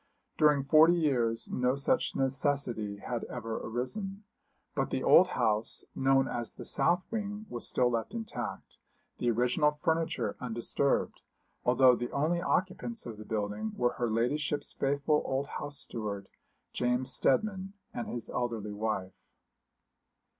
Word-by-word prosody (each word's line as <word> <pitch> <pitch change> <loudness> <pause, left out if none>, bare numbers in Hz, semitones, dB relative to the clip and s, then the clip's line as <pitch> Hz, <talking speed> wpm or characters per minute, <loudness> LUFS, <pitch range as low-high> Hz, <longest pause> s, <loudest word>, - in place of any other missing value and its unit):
During 150 -3 +4
forty 160 +4 +6
years 125 -9 +1
no 125 +1 +1
such 140 - +1
necessity 135 -6 0
had 115 +3 -4
ever 115 -2 -4
arisen; 195 - -4 0.5
but - - -1
the - - -2
old - - +7
house, 110 +1 0
known 135 0 +3
as 120 -1 -3
the - - -8
south 175 +1 +2
wing, 210 -1 -3
was 120 - -1
still 125 -1 +2
left 115 - -2
intact, 225 -1 -5 0.4
the 120 - +1
original 125 +6 +3
furniture 160 +2 -1
undisturbed, 125 +3 -1 0.4
although 125 0 +6
the 120 0 -3
only 160 +5 +1
occupants 190 +6 -1
of 115 -3 -7
the 110 - -8
building 105 0 -2
were 120 0 +1
her 120 -1 +1
ladyship's 145 +6 0
faithful 140 +2 +1
old 135 +1 -1
house 145 0 -5
steward, 100 -6 -4 0.5
James 125 +1 0
Steadman, 195 +6 +1 0.2
and 120 - -4
his 120 -2 -3
elderly 115 -4 -3
wife. 105 -3 -2
130 Hz, 135 wpm, -31 LUFS, 115-150 Hz, 0.5 s, old